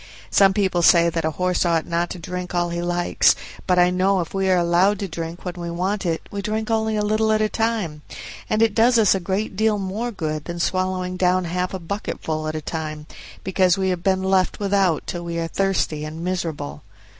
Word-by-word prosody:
Some 195 -1 +5
people 190 -3 +1
say 170 0 +5
that 165 -1 -2
a - - +2
horse 180 0 +1
ought 165 -2 +1
not 170 +1 -1
to - - -6
drink 180 +1 -5
all 175 0 0
he 170 0 -2
likes; 175 0 +2 0.3
but 180 -1 +3
I 180 0 +5
know 190 +1 +2
if 170 - -4
we 195 -1 0
are 185 - +4
allowed 175 +4 +3
to 195 - -4
drink 165 +1 -6
when 180 - -3
we 170 -1 -5
want 185 +3 -2
it 165 -1 -1
we 200 - -3
drink 215 +2 -2
only 220 -1 +1
a 210 - 0
little 215 +1 +1
at 215 - +3
a 215 - +2
time, 215 -11 -1 0.5
and 215 +1 +3
it 225 -2 +2
does 235 +3 +4
us 215 -4 +5
a 195 - 0
great 190 +3 -2
deal 215 +1 +2
more 200 +5 -3
good 155 -8 -4
than 170 0 -5
swallowing 185 0 -1
down 185 0 +2
half 180 +2 -2
a 190 - -3
bucketful 165 -4 -4
at 155 - -3
a 155 - -3
time, 155 -1 -5 0.4
because 185 -1 +2
we 190 -1 0
have 180 -2 -1
been 190 +1 +1
left 190 -1 +1
without 195 -5 +1
till 175 -1 -5
we 170 0 -4
are 165 0 -1
thirsty 185 -5 0
and 155 +2 -6
miserable. 165 - -3
180 Hz, 225 wpm, -22 LUFS, 170-195 Hz, 0.5 s, Some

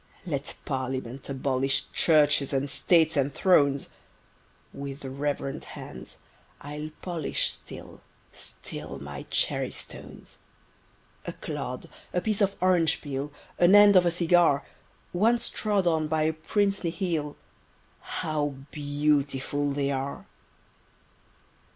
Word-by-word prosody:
Let 145 -5 -3
Parliament 130 -1 -3
abolish 135 0 +1
Churches 150 -3 +4
and 135 +1 +1
States 160 0 +3
and 140 0 +2
Thrones: 140 -5 +3 0.8
With 140 0 -7
reverent 140 +1 -3
hand - - -9 0.4
I'll 150 +1 -6
polish 170 -5 -1
Still, - - -11 0.3
still - - -6
my - - -8
Cherrystones! - - -2 0.9
A - - -3
clod—a 180 - -5
piece 215 0 0
of 200 0 +2
orange 180 -3 +3
peel 140 0 -4 0.3
An 175 +3 +7
end 205 -1 +8
of 180 -1 +6
a - - +5
cigar— 170 -4 +3 0.5
Once 225 +6 +2
trod 205 -3 0
on 160 -2 +2
by 155 0 +1
a 160 +1 +2
Princely 195 +3 0
heel, 165 -5 -2 0.6
How 145 -2 -2 0.2
beautiful 145 -1 0
they 140 0 0
are! 135 +1 -3
150 Hz, 110 wpm, -27 LUFS, 140-175 Hz, 0.9 s, end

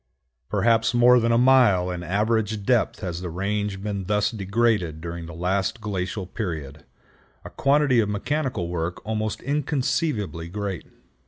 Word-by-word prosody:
Perhaps 115 0 +2
more 125 +1 +6
than 115 0 +1
a 115 - +4
mile 120 -8 +4
in 90 -1 -4
average 105 +3 0
depth 120 -2 +1
has 90 -3 -4
the 90 - -4
range 100 +2 -2
been 100 -2 -3
thus 105 +1 +1
degraded 100 -5 0
during 85 0 -6
the 85 - -9
last 95 +5 -1
glacial 95 -2 -3
period,—a 80 -8 -8
quantity 140 -2 +3
of 105 -2 +1
mechanical 125 - -2
work 85 +1 -4
almost 110 0 -3
inconceivably 130 - -1
great. 100 -2 -4
105 Hz, 140 wpm, -24 LUFS, 90-120 Hz, -, more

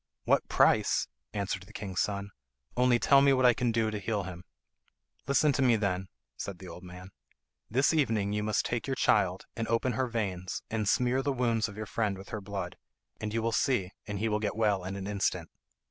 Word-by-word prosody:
"What - - +2
price?" - - +3 0.2
answered 100 -2 -2
the 110 - -15
king's 95 -5 -4
son; 100 0 -2 0.4
"only 125 -1 +4
tell 140 +3 +5
me 140 0 +5
what 130 -1 +3
I 125 - +7
can 120 0 0
do 110 -1 +1
to 105 - -3
heal 105 0 -1
him." 90 -1 -8 0.8
"Listen 145 +2 +4
to 140 - 0
me, 125 -3 +5
then," 95 -3 -1 0.3
said 100 -3 -5
the 95 - -10
old 90 - -9
man. 90 +1 -11 0.6
"This 135 +8 +3
evening 110 -9 +1
you 105 - 0
must 105 0 0
take 120 0 -2
your 135 - 0
child, 95 -6 +2
and 115 -1 -2
open 115 +3 +1
her 130 +3 0
veins, 95 -6 -3
and 110 -2 0
smear 125 0 +2
the 140 +1 0
wounds 115 -4 +1
of 100 - -11
your 110 - -4
friend 105 -2 -1
with 95 - -11
her 110 - -4
blood. 95 -3 -5 0.4
And 110 -1 -3
you 115 +1 -1
will 115 - +1
see, 110 -5 +1 0.2
he 105 +1 -1
will 105 -1 +1
get 105 -1 -2
well 105 -4 +1
in 95 +2 -4
an 100 -1 -5
instant." 100 -1 -1
105 Hz, 210 wpm, -30 LUFS, 100-120 Hz, 0.8 s, I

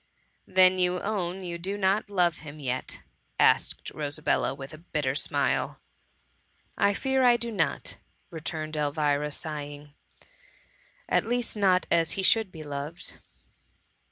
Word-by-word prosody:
" - - -43
Then 185 0 +5
you 180 0 +2
own 190 -3 -2
you 170 -1 -5
do 195 +4 -3
not 200 +2 +1
love 175 -4 +2
him 150 -1 -10
yet? 130 -2 -3 0.4
asked - - +3
Rosabella, 145 -2 -1
with 135 +2 -9
a 155 - -10
bitter 150 -5 -2
smile. 145 - +1 1.0
I 200 0 +3
fear 265 +2 +1
I 245 -2 +6
do 235 0 -3
not,'* 160 -9 -1 0.3
returned 155 -1 -5
Elvira, 150 0 +1
sighing, 145 -1 -6 0.3
*^ - - -23 0.8
at - - +2
least 240 -1 -1
not 190 -3 +3
as 165 -1 +3
he 195 - -2
should 220 0 +3
be 160 -3 -9
loved. 145 +3 -6
170 Hz, 140 wpm, -28 LUFS, 150-195 Hz, 1.0 s, I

